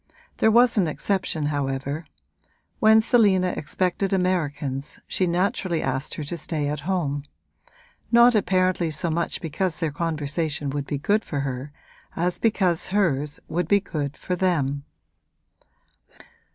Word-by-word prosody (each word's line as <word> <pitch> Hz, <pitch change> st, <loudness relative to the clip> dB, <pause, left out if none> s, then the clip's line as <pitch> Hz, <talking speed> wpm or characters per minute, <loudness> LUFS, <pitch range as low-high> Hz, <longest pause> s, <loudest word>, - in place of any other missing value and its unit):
There 220 Hz, -, +4 dB
was 235 Hz, 0 st, +5 dB
an 180 Hz, -, +2 dB
exception 165 Hz, -1 st, -1 dB
however; 140 Hz, +2 st, -3 dB, 0.7 s
when 220 Hz, 0 st, +6 dB
Selina 200 Hz, -6 st, +3 dB
expected 185 Hz, +5 st, -1 dB
Americans 150 Hz, -7 st, -1 dB
she 185 Hz, -, 0 dB
naturally 180 Hz, -1 st, 0 dB
asked 130 Hz, +1 st, -2 dB
her 155 Hz, -, -4 dB
to 160 Hz, +4 st, -4 dB
stay 155 Hz, -2 st, -2 dB
at 150 Hz, 0 st, -3 dB
home: 145 Hz, -7 st, -1 dB, 0.9 s
not 240 Hz, +1 st, +7 dB
apparently 185 Hz, -4 st, +2 dB
so 160 Hz, +2 st, 0 dB
much 170 Hz, +2 st, -2 dB
because 165 Hz, +1 st, -2 dB
their 165 Hz, -3 st, -1 dB
conversation 150 Hz, -2 st, -2 dB
would 145 Hz, 0 st, -3 dB
be 145 Hz, -, -2 dB
good 205 Hz, +9 st, +1 dB
for 145 Hz, -3 st, -3 dB
her 135 Hz, +1 st, -4 dB, 0.4 s
as 175 Hz, +1 st, -1 dB
because 185 Hz, -7 st, +2 dB
hers 150 Hz, -8 st, 0 dB
would 170 Hz, 0 st, -1 dB
be 200 Hz, +3 st, +4 dB
good 145 Hz, -6 st, -4 dB
for 180 Hz, -, -3 dB
them. 145 Hz, -6 st, 0 dB
170 Hz, 135 wpm, -24 LUFS, 145-185 Hz, 0.9 s, not